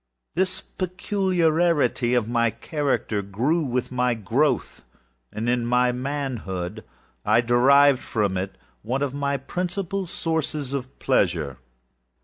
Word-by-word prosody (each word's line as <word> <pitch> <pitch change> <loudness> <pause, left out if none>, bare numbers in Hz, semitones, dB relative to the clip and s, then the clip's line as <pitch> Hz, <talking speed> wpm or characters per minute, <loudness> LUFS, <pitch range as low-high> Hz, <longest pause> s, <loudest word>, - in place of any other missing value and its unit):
This 185 +1 0
peculiarity 175 - +1
of 120 -3 +1 0.3
character 140 -8 -1
grew 120 - 0
with 125 -4 -2
my 125 -1 +1
growth, 115 +8 0 0.5
and 110 +2 -3
in 120 0 +2
my 125 +1 +3
manhood, 120 -8 -4 0.4
I 110 +3 +4
derived 130 +3 +5
from 100 -3 -1
it 95 +1 -3 0.3
one 130 +6 -1
of 140 -2 -2
my 140 0 -1
principal 180 +6 -3
sources 155 -5 -2
of 130 -1 -5
pleasure. 85 - +1
130 Hz, 115 wpm, -24 LUFS, 115-155 Hz, 0.5 s, derived